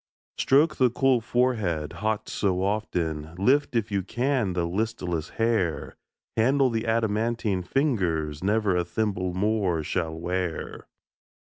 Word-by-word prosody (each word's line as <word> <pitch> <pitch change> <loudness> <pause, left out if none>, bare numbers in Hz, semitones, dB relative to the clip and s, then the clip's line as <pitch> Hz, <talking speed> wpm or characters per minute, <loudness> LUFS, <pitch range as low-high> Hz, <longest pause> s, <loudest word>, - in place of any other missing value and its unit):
Stroke 150 +4 +3
the 130 -1 +4
cool 130 0 +2
forehead, 110 -11 0
hot 110 0 -2
so 95 -2 0
often, 85 -6 -2
Lift, 130 +8 +2
if 115 -2 0
you 100 -1 +1
can, 120 0 0
the 90 -1 0
listless 90 -4 -2
hair; 110 -8 0 0.4
Handle 130 +3 +3
the 115 0 -2
adamantine 110 -2 0
fingers 90 - 0
Never 105 -1 +2
a 90 - +2
thimble 95 -2 -2
more 95 -5 +1
shall 80 +1 -2
wear. 90 0 -3
105 Hz, 125 wpm, -26 LUFS, 90-115 Hz, 0.4 s, the